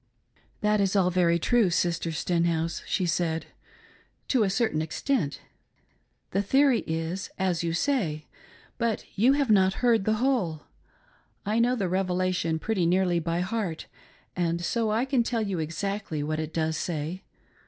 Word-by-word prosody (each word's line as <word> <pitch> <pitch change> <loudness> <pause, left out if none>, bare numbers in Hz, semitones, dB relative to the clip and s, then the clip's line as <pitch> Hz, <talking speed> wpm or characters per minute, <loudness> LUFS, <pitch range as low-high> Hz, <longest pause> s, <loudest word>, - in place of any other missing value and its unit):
" - - -36
That 210 -1 +2
is 195 0 +1
all 185 -2 +3
very 170 -1 +3
true, 225 +3 +3
Sister 170 -1 0
Stenhouse," 165 0 0
she 185 - 0
said, 165 -1 -1 0.4
" - - -32
to 255 - +3
a 205 - +3
certain 195 -6 0
extent. 160 - -1 0.9
The 195 - +1
theory 265 +4 +3
is 165 +4 -3
as 185 -3 0
you 165 -1 -1
say, 170 - 0 0.5
but 230 -2 -1
you 235 +7 +4
have 280 -5 +1
not 190 -2 +4
heard 230 -5 +3
the 215 - +2
whole. 215 - 0 0.8
I 215 +3 +1
know 245 +2 +3
the 200 -6 -1
Revelation 185 -2 0
pretty 185 0 0
nearly 180 -1 +2
by 170 +1 -1
heart 185 -4 -3 0.5
and 170 -1 0
so 230 +2 0
I 225 +4 +1
can 265 -2 +2
tell 230 -1 -1
you 195 -4 -2
exactly 165 0 -3
what 155 +1 -2
it 155 0 -4
does 160 -1 -1
say. 165 +3 -3
185 Hz, 160 wpm, -27 LUFS, 165-220 Hz, 0.9 s, you